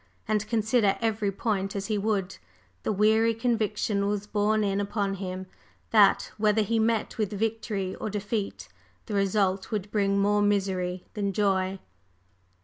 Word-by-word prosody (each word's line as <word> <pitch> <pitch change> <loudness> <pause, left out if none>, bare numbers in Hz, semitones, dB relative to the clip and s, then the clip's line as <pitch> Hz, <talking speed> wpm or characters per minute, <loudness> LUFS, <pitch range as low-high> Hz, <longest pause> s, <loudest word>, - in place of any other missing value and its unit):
And 215 -1 0
consider 220 -2 +2
every 220 -3 0
point 195 -1 -2
as 200 0 -2
he 215 - -1
would, 200 -2 -1 0.4
the - - -1
weary 220 +2 +3
conviction 215 -3 0
was 205 0 -1
borne 210 +1 +1
in 200 0 0
upon 200 -1 -1
him 185 -1 -5 0.5
that, 205 -3 +5
whether 215 0 +3
he 225 +2 0
met 225 0 0
with 210 -3 0
victory 210 -3 -2
or - - -4
defeat, 205 0 -3 0.4
the - - -6
result 195 -1 +1
would 205 -2 -3
bring 200 -2 +1
more 205 +1 +3
misery 190 -3 0
than 200 -2 -2
joy. 190 -1 +1
205 Hz, 145 wpm, -27 LUFS, 195-215 Hz, 0.5 s, that